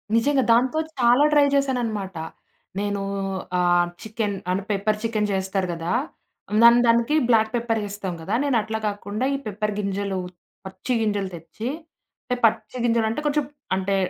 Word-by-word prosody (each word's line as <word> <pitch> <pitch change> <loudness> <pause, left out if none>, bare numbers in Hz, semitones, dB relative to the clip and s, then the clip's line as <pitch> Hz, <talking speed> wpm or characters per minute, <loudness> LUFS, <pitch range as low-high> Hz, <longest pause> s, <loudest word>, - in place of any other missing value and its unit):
నిజంగా 265 +4 +3
దాంతో 255 +6 +2 0.2
చాలా 245 +4 +5
ట్రై 290 -1 +6
చేశాననమాట. 230 -9 -1 0.6
నేను 205 -1 -1 0.6
ఆహ్, 175 -1 +3
చికెన్ 215 -2 -2 0.2
అంటే 190 +2 -1
పెప్పర్ 210 +2 0
చికెన్ 215 -2 0
చేస్తారు 190 0 -1
కదా! 165 +1 -4 0.7
దాన్ 235 +1 +8
దానికి 235 +5 +3
బ్లాక్ 220 -2 +4
పెప్పర్ 230 -2 0
ఎస్తాం 200 -2 -4
కదా! 190 +6 -4
నేను 280 -4 +2
అట్లా 220 +1 -3
కాకుండా 205 +3 -3
ఈ - - -1
పెప్పర్ 210 0 -2
గింజలు, 200 -1 -2 0.5
పచ్చి 190 +6 -4
గింజలు 205 -3 0
తెచ్చి 170 +8 -7 0.6
అంటే 250 - -2
పచ్చిగింజలంటే 230 +2 +1
కొంచెం 295 0 +2 0.3
అంటే 190 +1 0
215 Hz, 135 wpm, -23 LUFS, 200-235 Hz, 0.7 s, దాన్